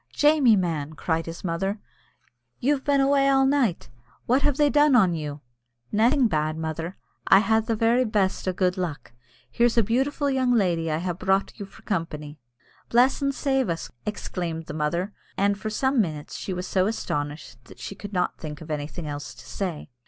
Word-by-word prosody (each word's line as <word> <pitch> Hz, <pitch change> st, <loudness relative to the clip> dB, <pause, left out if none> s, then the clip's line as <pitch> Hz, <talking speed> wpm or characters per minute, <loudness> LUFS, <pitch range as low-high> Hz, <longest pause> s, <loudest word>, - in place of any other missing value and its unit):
"Jamie, 295 Hz, -6 st, +5 dB
man!" 160 Hz, -5 st, -1 dB
cried 160 Hz, +1 st, -2 dB
his 165 Hz, 0 st, -7 dB
mother, 195 Hz, +4 st, -1 dB, 0.8 s
"you've 275 Hz, +1 st, +1 dB
been 285 Hz, -1 st, +2 dB
awa' 275 Hz, 0 st, +3 dB
all 270 Hz, -1 st, +4 dB
night; 265 Hz, -10 st, +1 dB, 0.4 s
what 255 Hz, +3 st, +3 dB
have 290 Hz, -2 st, +1 dB
they 295 Hz, -1 st, +4 dB
done 290 Hz, -1 st, +4 dB
on 190 Hz, -7 st, +5 dB
you?" 150 Hz, -2 st, -5 dB, 0.5 s
"Naething 240 Hz, +5 st, +4 dB
bad, 155 Hz, -3 st, -1 dB
mother; 160 Hz, +3 st, -4 dB, 0.3 s
I 195 Hz, -, +8 dB
ha' 220 Hz, +1 st, +2 dB
the 225 Hz, 0 st, -1 dB
very 230 Hz, +3 st, +3 dB
best 205 Hz, -5 st, 0 dB
of 185 Hz, -, 0 dB
gude 185 Hz, 0 st, +1 dB
luck. 160 Hz, -11 st, -4 dB, 0.4 s
Here's 235 Hz, 0 st, +2 dB
a 230 Hz, -, +6 dB
beautiful 270 Hz, +7 st, 0 dB
young 260 Hz, -2 st, +2 dB
lady 170 Hz, -6 st, +1 dB
I 155 Hz, -, 0 dB
ha' 175 Hz, +2 st, -2 dB
brought 190 Hz, +4 st, 0 dB
you 200 Hz, -, -6 dB
for 195 Hz, -, -18 dB
company. 155 Hz, -6 st, -4 dB, 0.5 s
"Bless 245 Hz, +3 st, +4 dB
us -, -, -11 dB
an' 275 Hz, 0 st, +1 dB
save 270 Hz, -5 st, 0 dB
us!" 165 Hz, -1 st, -3 dB
exclaimed 175 Hz, -5 st, -4 dB
the -, -, -7 dB
mother, 170 Hz, +6 st, -1 dB, 0.2 s
and 200 Hz, +1 st, +2 dB
for 215 Hz, +2 st, -5 dB
some 265 Hz, +3 st, +2 dB
minutes 155 Hz, -6 st, -4 dB
she -, -, -5 dB
was 180 Hz, 0 st, -3 dB
so 185 Hz, 0 st, +1 dB
astonished 145 Hz, -, -4 dB
that -, -, -15 dB
she -, -, -6 dB
could 205 Hz, +1 st, -9 dB
not 180 Hz, -3 st, -1 dB
think 150 Hz, -2 st, -7 dB
of 160 Hz, 0 st, -8 dB
anything 150 Hz, +3 st, -4 dB
else 145 Hz, -1 st, -6 dB
to -, -, -14 dB
say. 170 Hz, -7 st, -4 dB
195 Hz, 190 wpm, -25 LUFS, 160-245 Hz, 0.8 s, I